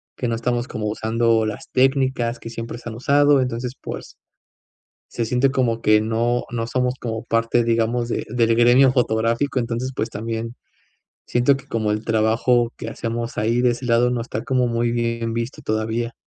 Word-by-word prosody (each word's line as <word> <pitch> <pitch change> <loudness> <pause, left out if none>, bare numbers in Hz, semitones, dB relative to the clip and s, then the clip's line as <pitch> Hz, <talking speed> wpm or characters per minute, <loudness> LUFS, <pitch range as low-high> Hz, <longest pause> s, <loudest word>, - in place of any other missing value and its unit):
que 125 - -2
no 115 - 0
estamos 120 +1 -1
como 110 -3 -5
usando, 110 +1 +1
las 105 -1 -5
técnicas 130 -2 +1
que 115 - -8
siempre 115 +1 -6
se 120 - -8
han 110 - -7
usado. 145 +3 +4
Entonces, 125 0 -3
pues. - - -8 0.9
Se 115 - -2
siente 125 +4 +2
como 120 -4 0
que 105 0 +4
no 115 +2 0
no 115 -1 -2
somos 125 +1 0
como 110 -2 -4
parte, 115 +1 +1
digamos, 115 +1 0
de - - -3
del 115 -1 +2
gremio 125 +3 +5
fotográfico. 115 +2 0
Entonces, 120 +1 -2
pues, 110 - -2
también 115 +2 -4 0.7
siento 125 +3 +3
que, 135 - -10
como 110 -2 -1
el 105 - -3
trabajo 115 +2 +2
que 115 - -5
hacemos 115 +1 -4
ahí, 115 +3 +1
de 125 - +4
ese 120 +2 -5
lado. 120 0 +3
No 125 - -1
está 115 -1 -4
como 130 -2 +1
muy 115 0 0
bien 115 -1 -1
visto 115 +2 -4
todavía. 110 +2 -2
115 Hz, 180 wpm, -22 LUFS, 115-125 Hz, 0.9 s, gremio